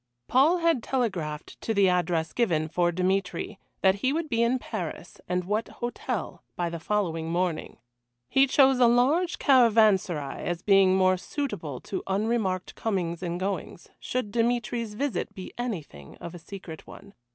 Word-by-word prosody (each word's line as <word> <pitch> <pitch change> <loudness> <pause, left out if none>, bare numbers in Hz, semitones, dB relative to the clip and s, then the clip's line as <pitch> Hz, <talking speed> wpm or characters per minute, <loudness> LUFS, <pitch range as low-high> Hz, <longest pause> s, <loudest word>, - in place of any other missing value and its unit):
Paul 290 +8 +4
had 330 -7 +2
telegraphed 185 - -3
to 225 - -2
the 200 -1 +5
address 175 -3 0
given, 170 -10 +1
for 175 +1 +1
Dmitry, 185 +2 -1 0.2
that 190 -1 +6
he 260 - +2
would 315 +1 -2
be 230 -3 +1
in 235 +2 +3
Paris, 180 -8 -6
and 180 0 0
at - - -13
what 215 +3 0
hotel, 240 0 -4
by 175 -1 -2
the 170 - -5
following 165 -4 -1
morning. 175 -1 -2 0.5
He 270 - +4
chose 265 -1 +4
a 245 - +6
large 280 +10 +3
caravanserai 215 - +3
as 175 0 -3
being 195 -2 +5
more 185 0 +4
suitable 180 - -4
to 195 - -4
unremarked 195 -2 -1
comings 180 -6 -2
and 175 -1 -3
goings, 185 -2 -4
should 250 -5 -3
Dmitry's 235 -1 -1
visit 215 -6 -2
be 190 -2 -8
anything 160 - -6
of 170 - -8
a 175 - -9
secret 165 -2 -10
one. 200 - -13
195 Hz, 160 wpm, -27 LUFS, 175-240 Hz, 0.5 s, that